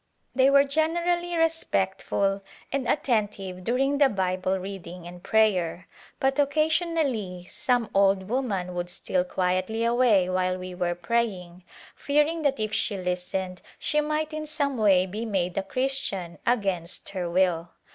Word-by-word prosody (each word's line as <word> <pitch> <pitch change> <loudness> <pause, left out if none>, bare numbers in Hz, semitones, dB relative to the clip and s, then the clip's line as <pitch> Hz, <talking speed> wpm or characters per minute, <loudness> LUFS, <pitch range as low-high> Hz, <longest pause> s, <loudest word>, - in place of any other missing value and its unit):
They 265 +1 +5
were 280 0 +6
generally 340 +4 0
respectful 200 -11 0 0.3
and 265 -3 -1
at - - +1
tentive 205 -6 -1
during 270 +6 +1
the 280 -2 +6
Bible 185 -2 0
reading 180 -2 -7
and 175 0 -10
prayer, 185 -6 +1 0.3
but 270 +1 +1
oc 285 0 +1
casionally 305 - 0
some 245 +1 0
old 195 -1 +3
woman 205 -7 -1
would 175 0 -3
steal 180 0 -1
quietly 185 +5 -1
away 235 -5 +4
while 185 0 0
we 185 0 -7
were 175 -1 -1
praying, 180 -2 -2 0.3
fearing 300 +3 +1
that 280 -4 +1
if 215 0 -2
she 205 -2 0
listened 180 0 -3 0.2
she 300 - +1
might 305 +1 -2
in 310 0 -4
some 285 -2 -1
way 195 -5 +4
be 205 +4 -5
made 185 -5 -1
a - - +1
Christian 195 -6 -2
against 195 -8 -1
her 180 -3 -3
will. 175 -1 +1
200 Hz, 145 wpm, -26 LUFS, 185-270 Hz, 0.3 s, were